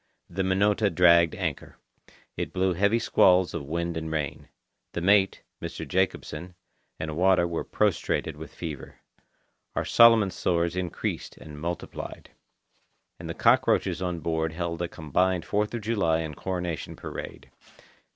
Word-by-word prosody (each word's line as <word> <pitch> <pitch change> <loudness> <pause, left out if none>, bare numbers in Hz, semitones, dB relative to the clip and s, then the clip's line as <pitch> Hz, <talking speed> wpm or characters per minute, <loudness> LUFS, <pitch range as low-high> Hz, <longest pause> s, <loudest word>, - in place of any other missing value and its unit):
The 95 +3 -2
Minota 100 +3 +2
dragged 85 -1 +5
anchor. - - -4 0.6
It - - -4
blew 95 0 +1
heavy 100 +6 +2
squalls 90 -6 +4
of 70 - -5
wind 85 +2 -2
and 80 -1 -4
rain. 75 -3 -3 0.5
The 85 - -3
mate, 95 +1 +3 0.2
Mr. - - -6
Jacobsen, 90 -2 -2 0.4
and 80 -1 -4
Wada 90 0 +3
were 85 -1 -3
prostrated - - 0
with - - -9
fever. 80 -4 -8 0.7
Our - - -1
Solomon 115 -4 +6
sores 85 -1 0
increased 90 -2 -4
and 75 -1 -11
multiplied. 85 +1 -6 0.9
And - - -7
the - - -4
cockroaches - - +3
on 90 -2 -2
board 80 -1 -1
held 85 0 -3
a 85 - -1
combined 85 +3 0
Fourth 105 +1 0
of 115 - -4
July 100 -7 +1
and 80 -2 -5
Coronation 90 -2 -4
Parade. - - -8
85 Hz, 140 wpm, -27 LUFS, 80-95 Hz, 0.9 s, Solomon